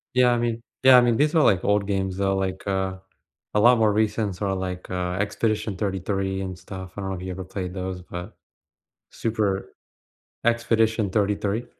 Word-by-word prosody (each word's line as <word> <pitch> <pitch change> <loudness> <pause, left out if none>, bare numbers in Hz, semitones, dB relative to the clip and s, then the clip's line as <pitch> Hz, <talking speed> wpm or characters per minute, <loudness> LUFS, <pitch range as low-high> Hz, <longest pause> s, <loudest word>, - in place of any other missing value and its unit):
Yeah, 125 -1 +5
I 120 - +2
mean 115 -1 -1 0.2
yeah, 130 -1 +9
I 125 - +8
mean, 120 -1 +3
these 150 +4 +2
are, 155 - +5
like, 95 -3 +3
old 105 -1 +2
games, 95 -1 -1
though. 95 0 +1
Like, 95 0 -2
uh, 95 -1 -1 0.6
a 105 - +3
lot 120 +3 +6
more 110 -2 +3
recents 105 -3 0
are, 100 -2 0
like, 90 -1 -5
uh, 90 -1 -2
Expedition 105 0 -1
33 95 -1 -2
and 95 -2 -5
stuff. 95 0 -9
I 100 - -3
don't 95 - -3
know 95 - -2
if - - -8
you 95 - -5
ever 95 +1 -5
played 90 -1 -5
those, 95 -1 -4
but 90 +3 -8 0.8
super 105 -4 -2 0.7
Expedition 115 -2 +2
33. 105 +3 0
100 Hz, 190 wpm, -24 LUFS, 95-110 Hz, 0.8 s, yeah